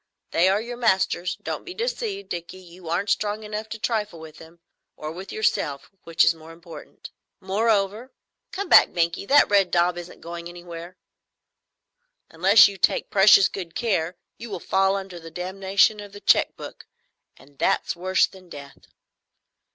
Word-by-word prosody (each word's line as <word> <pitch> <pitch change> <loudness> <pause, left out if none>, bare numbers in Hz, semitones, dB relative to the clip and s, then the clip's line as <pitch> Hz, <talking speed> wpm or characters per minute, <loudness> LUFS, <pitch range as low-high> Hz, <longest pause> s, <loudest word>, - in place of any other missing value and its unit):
They 175 +3 +3
are 195 +2 +2
your 240 +2 -7
masters. 190 -5 +1
Don't - - -4
be 365 -1 -9
deceived, 445 -4 -4
Dickie, 175 +1 -6
you 180 -2 -13
aren't 180 +5 -1
strong 210 +1 -1
enough 215 +1 -6
to 225 - -6
trifle 210 -6 -2
with 160 -1 -12
them,—or 165 -1 -12
with 185 +4 -9
yourself, 145 -9 -2
which 165 0 +3
is - - +4
more 160 0 -14
important. 165 -2 -12 0.3
Moreover,—Come 215 - -3
back, - - +7
Binkie: 170 +3 -1
that 290 +1 +5
red 195 -3 +4
daub 175 0 +1
isn't 175 0 -11
going 170 0 -8
anywhere,—unless 180 - -1
you 200 - -7
take - - 0
precious 195 0 +6
good 175 -4 -8
care, 185 -7 -1 0.2
you 235 - -8
will 195 -3 -5
fall 195 +2 +1
under 190 -3 -6
the 165 0 -11
damnation 190 +4 +1
of 205 -1 -10
the 205 - -11
check - - +3
book, - - -11 0.5
and 140 +1 -21
that's - - 0
worse 185 +2 +2
than 185 -2 -16
death. 140 -2 -12
190 Hz, 155 wpm, -24 LUFS, 170-210 Hz, 0.5 s, back